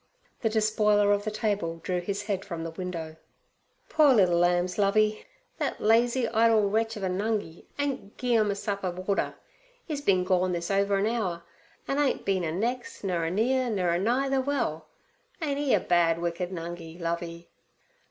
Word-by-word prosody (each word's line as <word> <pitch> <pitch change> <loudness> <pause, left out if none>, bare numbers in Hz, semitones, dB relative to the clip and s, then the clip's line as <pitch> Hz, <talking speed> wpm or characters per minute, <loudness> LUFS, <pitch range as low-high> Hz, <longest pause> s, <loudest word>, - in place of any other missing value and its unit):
The 225 - +2
despoiler 210 -1 +3
of 205 +1 -1
the - - 0
table 205 -6 -1
drew 180 0 -1
his 200 +3 -3
head 200 -2 -2
from 170 -3 -5
the 165 - -5
window. 165 -2 -6 0.7
'Poor 295 -4 +5
liddle 180 -5 +4
lambs, 175 +2 +1
Lovey! 215 - +2 0.3
Thet - - -2
lazy, 235 +3 +3
idle 225 -2 +4
wretch 225 +2 0
ov 200 - -6
a - - +1
Nungi 200 -2 -2
ain't 275 -8 -3
gi' 245 -2 +1
'em 215 -2 +3
a 200 - 0
sup 200 0 -3
of 185 0 -4
water. 200 - 0 0.5
'E's 300 -4 -3
been 185 -9 +3
gorn 185 0 +1
this 170 +2 -3
over 200 0 +2
an 195 - +1
hour, 200 -7 -1 0.4
an' 275 - 0
ain't 285 -2 +1
bin 190 -2 +1
a 160 - -1
nex', 235 +9 -3
nur 175 -4 0
a - - 0
near, 245 +7 +1
nur 190 -5 0
a 170 - +1
nigh 245 +7 +1
ther 270 -1 +2
well. 250 - -2 0.5
Ain't 285 -4 -1
'e 290 -2 0
a - - +2
bad, 170 -2 +2
wicked 170 +1 -2
Nungi, 170 -1 -7
Lovey?' 170 0 -4
200 Hz, 185 wpm, -27 LUFS, 175-225 Hz, 0.7 s, Poor